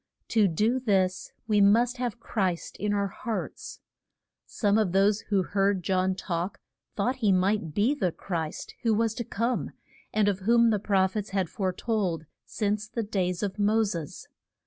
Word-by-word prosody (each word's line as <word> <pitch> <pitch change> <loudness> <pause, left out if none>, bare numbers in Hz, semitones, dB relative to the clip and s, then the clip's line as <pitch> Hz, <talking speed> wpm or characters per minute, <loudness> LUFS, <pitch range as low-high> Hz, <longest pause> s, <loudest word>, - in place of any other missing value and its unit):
To 215 -3 +4
do 215 +9 +1
this 190 -6 0 0.2
we 210 -2 +3
must 230 +5 +4
have 245 -3 -3
Christ 190 -7 -2
in 210 0 -1
our 200 -1 0
hearts. 225 +2 -5 0.7
Some 205 -1 +1
of 195 -5 0
those 200 +2 +4
who 195 -3 +2
heard 195 -1 +1
John 185 0 +1
talk 175 0 -3 0.4
thought 245 +6 0
that - - -25
he 215 -5 +3
might 185 -3 +1
be 225 +7 +3
the 190 -12 0
Christ 165 -3 -5
who 225 -2 +2
was 225 0 +1
to 235 - -4
come, 230 +3 -1 0.4
and 215 -1 +2
of 200 -2 +1
whom 230 +3 +4
the 210 - +1
proph 190 -1 +1
ets 210 -1 -2
had 190 -4 -1
fore 190 -2 -1
told 185 -6 -2 0.2
since 210 0 -1
the 230 +1 -3
days 185 -3 -1
of 200 0 -3
Mos 210 0 +2
es. 165 -4 -7
205 Hz, 175 wpm, -27 LUFS, 185-220 Hz, 0.7 s, To